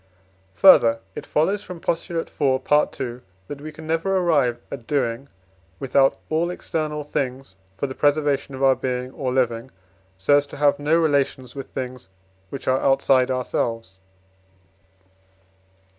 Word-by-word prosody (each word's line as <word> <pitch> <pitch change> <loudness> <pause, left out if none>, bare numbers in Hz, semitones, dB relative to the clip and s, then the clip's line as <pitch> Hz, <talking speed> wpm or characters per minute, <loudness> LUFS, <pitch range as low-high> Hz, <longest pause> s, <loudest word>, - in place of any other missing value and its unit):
Further, 115 -12 +6
it - - -8
follows 195 +7 +1
from 180 -4 -9
Postulate 165 0 -2
iv., 130 -2 +2
Part 150 0 +2
II., 125 -2 -4 0.3
that 145 -1 -7
we 155 +1 -7
can 160 +1 -11
never 165 +4 0
arrive 145 -10 +2
at 120 -5 -7
doing 135 -2 -1 0.5
without 135 0 +2
all 165 +2 +1
external 155 -4 -3
things 135 -6 -4 0.2
for - - -1
the 130 - -5
preservation 145 -1 +1
of 135 - -4
our 135 -1 +6
being 125 0 -3
or 130 -2 -3
living, 125 -1 0 0.5
so 120 +10 +4
as 145 0 0
to - - -10
have 145 0 +3
no 150 +3 +2
relations 140 -5 0
with 135 -2 -7
things 125 -6 -7 0.4
which 140 - -8
are 130 +1 +2
outside 135 -1 +3
ourselves. 115 -6 -2
140 Hz, 145 wpm, -23 LUFS, 130-150 Hz, 0.5 s, Further